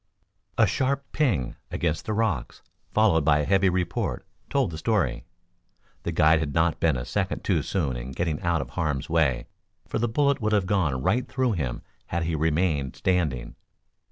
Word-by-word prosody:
A - - +6
sharp 140 +1 0
"ping" 100 - 0
against 80 -2 -1
the 110 - 0
rocks, 105 - -1 0.3
followed 100 -8 +3
by 75 0 +4
a - - -1
heavy 95 +1 +3
report, 90 -2 -2 0.2
told 135 -9 +1
the 80 - -6
story. 80 - 0 0.8
The - - -3
guide 80 +1 +4
had 75 -2 -2
been 80 - +2 0.4
not - - -1
a - - -4
second - - -2
too - - +2
soon 75 -10 -1
in - - -6
getting 80 +2 -2
out 85 -3 +1
of 60 - -14
harm's 75 -3 -2
way, 70 -7 +2 0.4
for - - -2
the 120 +1 +1
bullet 140 +3 +2
would 110 0 +1
have 100 -3 +3
gone 80 -10 0
right 125 - +1
through 130 -1 0
him 70 - -3 0.2
had 85 0 -1
he 80 0 -1
remained 80 -3 0
standing. 80 -10 0
85 Hz, 180 wpm, -26 LUFS, 70-105 Hz, 0.8 s, A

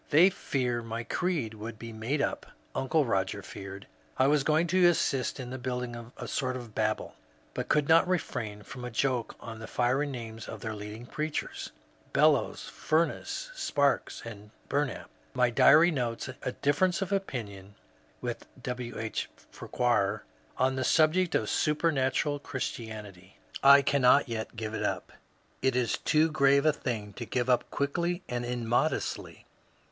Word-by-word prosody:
" - - -31
They 170 +6 +6
fear 125 -9 -1
my 115 0 -4
creed 160 -8 -1
will 110 +2 -6
be 115 +1 -9
made 120 +7 -1
up." - - -2 0.3
Uncle 150 +3 +1
Roger 95 -3 -1
feared 100 0 -8 0.3
I 130 - +4
was 145 0 +3
going 155 +3 +3
to 180 +1 +4
assist 140 -6 +1
in 130 0 -5
building 125 -2 -4
a - - -6
sort 130 -1 -1
of 120 -4 -8
Babel, 110 0 -1 0.4
but - - -4
could 150 -2 +3
not 165 +2 +6
refrain 110 - -2
&om 125 -2 -8
a 125 - -4
joke 125 0 -1
on 115 -1 -8
the 110 - -7
fiery 130 +5 +1
names 115 -4 -7
of - - -7
their 110 -2 -3
leading 105 +3 -7
preachers, 155 +4 -4 0.2
— - - -32
Bel - - +6
lows, - - -2
Fumess, 170 - -1
Sparks, 145 - 0
and 105 -2 -9 0.2
Bumap. 145 -3 -1 0.3
My 125 -1 +3
diary 155 +8 +7
notes 120 -6 -2 0.2
*^a - - -3
difference 170 +6 +2
of 195 - -7
opinion 105 - -4 0.5
[with - - -4 0.2
W. 125 -1 -4
H. 110 -1 -3 0.2
Farquhar] 105 -4 0 0.3
on 130 +1 +2
the 130 - 0
subject 165 +6 +3
of - - +1
Supernatural 145 -2 +1
Christianity. 105 -8 -6 0.2
I 140 0 +8
cannot 140 +1 +4
yet 115 0 -4
give 110 -1 -4
it - - -3
up. - - -2 0.5
It 130 -1 +2
is 125 -2 +1
too 155 +1 +3
grave 140 -1 +4
a 155 - +5
thing 110 -7 -4
to 120 - -6
give 125 -1 -1
up 125 - +2
quickly 170 +6 -1
and 120 0 -2
immodestly. 120 +5 -1
125 Hz, 160 wpm, -29 LUFS, 115-150 Hz, 0.5 s, I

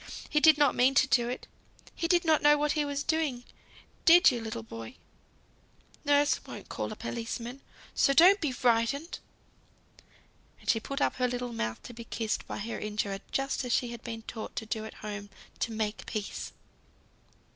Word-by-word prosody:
He 300 - +4
did 310 -1 +7
not 290 -3 +4
mean 260 +2 +3
to - - +6
do 240 -2 +2
it. 250 - -5 0.5
He 335 - -2
did 350 0 +3
not 315 -2 +4
know 295 0 +6
what 295 0 +1
he 300 - +1
was 285 0 -2
doing, 305 -7 -1 0.6
did 350 +3 +8
you, 240 - -3
little 220 - -5
boy? 115 0 -9 1.1
Nurse 290 0 +3
won't - - -10
call - - -4
a - - -5
policeman, 235 +2 -5 0.3
so - - +3
don't 365 +8 +7
be 300 -5 0
frightened." 250 +6 0 1.4
And - - -19
she 225 - +3
put 275 +5 -5
up - - +1
her 250 -1 +2
little 245 -1 -4
mouth 110 - -3
to 245 - -9
be 235 0 -8
kissed 225 -1 -3
by - - -5
her 225 +3 -4
injurer, 210 -2 -2
just 270 0 -1
as 250 - -1
she 245 - +1
had 235 -1 -8
been 225 -2 -6
taught 220 -1 -7
to 220 - -3
do 220 0 -3
at 220 - -9
home 205 -1 -6 0.3
to 230 - -1
"make 215 -1 -3
peace." 210 -2 -4
245 Hz, 185 wpm, -29 LUFS, 225-290 Hz, 1.4 s, did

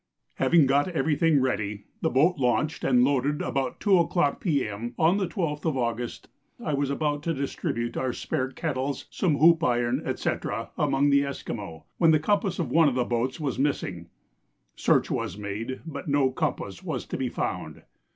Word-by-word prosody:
Having 165 -4 +4
got 140 +3 +3
every 160 -3 0
thing 160 -2 +3
ready, 105 -5 -1 0.2
the - - +2
boat 155 +8 +3
launched 135 +5 0
and 125 -2 +4
loaded 140 +2 +1
about 135 -1 -2
2 195 -4 +4
o'clock 170 -4 +1
P.M. 120 - -1
on 165 +4 +4
the 195 -3 0
12th 165 -5 -3
of 155 -4 0
August, 120 -1 -3 0.3
I 150 - -3
was 140 -1 0
about 145 +1 -1
to 165 +1 -1
distribute 120 -3 -3
our 130 -1 -1
spare 130 +1 -2
kettles, 135 -1 -3
some 160 -7 +1
hoop 165 +2 +5
iron, 120 -1 +1 0.2
&c. - - 0 0.4
among 145 +1 +2
the 140 0 +4
Esquimaux, 105 - -6
when 165 - +5
the 155 - +6
compass 195 +2 0
of 150 -8 -2
one 160 0 +5
of 130 - -4
the 125 -1 +1
boats 120 +4 -1
was 140 -5 -2
missing. 95 - -2 0.7
Search - - +2
was 100 - -2
made, 105 +5 -5
but 140 -3 -7
no 140 -2 +2
compass - - -3
was - - -4
to - - -5
be - - -1
found. - - -4
140 Hz, 180 wpm, -26 LUFS, 125-160 Hz, 0.7 s, the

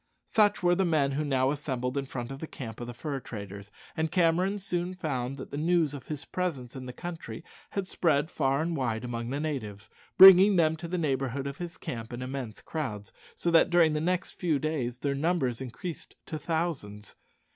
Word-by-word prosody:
Such 210 -3 +3
were 175 0 +5
the 190 +2 +2
men 155 -6 +2
who 145 +3 -1
now 135 -2 +2
assembled 130 -3 -3
in 140 -1 -2
front 125 -1 -5
of 135 - -7
the 160 - -5
camp 115 -6 -8
of 120 - -5
the 120 - -6
fur 140 +2 -3
traders, 100 -3 -8 0.2
and 160 0 -1
Cameron 180 +3 +2
soon 180 -2 -2
found 135 -6 -3
that 130 - -8
the 140 - -4
news 165 -2 +2
of 140 -3 -8
his 150 -1 -5
presence 140 -10 -3
in 130 -1 -7
the - - -5
country 170 +4 -7 0.3
had 195 -2 -3
spread 160 -3 +1
far 135 0 +1
and 170 0 -1
wide 115 -5 -1
among 120 -1 -4
the 140 +2 -2
natives, 110 -9 -4 0.3
bringing 190 +1 +10
them 160 -2 +4
to 170 - -6
the 180 +2 -2
neighbourhood 135 -4 -1
of 140 0 -5
his 175 -1 -6
camp 115 -2 -6
in 120 +1 -5
immense 130 -4 -5
crowds, 110 -11 -4 0.2
so 170 - 0
that 165 - +6
during 170 -3 +5
the 150 - 0
next 180 +3 0
few 165 -5 0
days 135 -5 -2
their 140 +2 -1
numbers 140 -5 0
increased 150 +7 -7
to 155 - -5
thousands. 145 - -3
145 Hz, 205 wpm, -29 LUFS, 125-170 Hz, 0.3 s, bringing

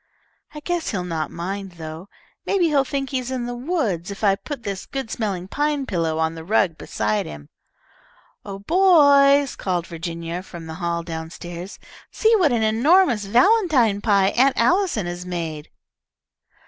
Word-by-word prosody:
"I 300 - -7
guess 350 +1 -2
he'll 190 -5 -2
not 165 -3 -3
mind, 190 +2 -5
though. 160 +3 -9 0.4
Maybe 360 -4 +2
he'll 285 -3 +3
think 275 0 -3
he 265 - 0
is 250 0 -6
in 255 -2 -3
the 245 - -4
woods 240 - -2
if 200 +2 -8
I 200 -2 +5
put 275 +4 -8
this 195 -2 -5
good 270 -5 -5
smelling 195 -5 -3
pine 290 +4 -1
pillow 165 -7 -1
on 160 0 0
the 165 0 -9
rug 185 -2 +1
beside 105 -7 -2
him." 75 -1 -10 0.9
"Oh, 195 -1 -7
boys," 285 - +5
called 180 -3 -2
Virginia 170 +1 -5
from 170 -3 -10
the 160 - -7
hall 170 -1 -1
down 160 -1 -6
stairs. 175 +2 -8 0.3
"See 450 +1 +3
what 340 -8 +3
an 235 -2 +1
enormous 240 - +3
valentine 250 - +3
pie 200 -3 +3
Aunt 265 +5 +2
Allison 345 - +2
has 175 0 -5
made!" 165 -4 -5
200 Hz, 165 wpm, -22 LUFS, 170-275 Hz, 0.9 s, I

